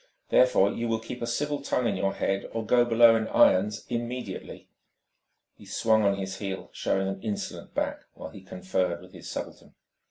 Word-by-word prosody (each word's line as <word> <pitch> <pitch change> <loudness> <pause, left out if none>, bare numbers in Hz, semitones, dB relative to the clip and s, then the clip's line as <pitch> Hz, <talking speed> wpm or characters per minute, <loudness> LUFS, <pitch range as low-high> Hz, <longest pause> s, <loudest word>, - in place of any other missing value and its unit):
Therefore, - - +4
you 120 - -3
will 115 -1 +1
keep 115 +2 -8
a 120 - -2
civil 145 +4 -1
tongue 125 -2 -1
in 100 - 0
your 95 +1 -1
head, 100 0 -1
or 115 -1 -3
go 120 +2 +4
below 115 -1 +6
in 110 -1 0
irons 105 +3 +3
immediately!" 120 -3 -5 0.9
He - - -17
swung 110 -1 +2
on 100 0 +3
his 95 -1 -4
heel, 95 -2 -5
showing 95 0 0
an 95 0 -4
insolent 105 -3 -5
back - - -1 0.2
while - - -8
he 100 - -11
conferred 90 -1 -2
with 90 +1 -15
his - - -10
subaltern. - - -7
110 Hz, 185 wpm, -27 LUFS, 95-120 Hz, 0.9 s, below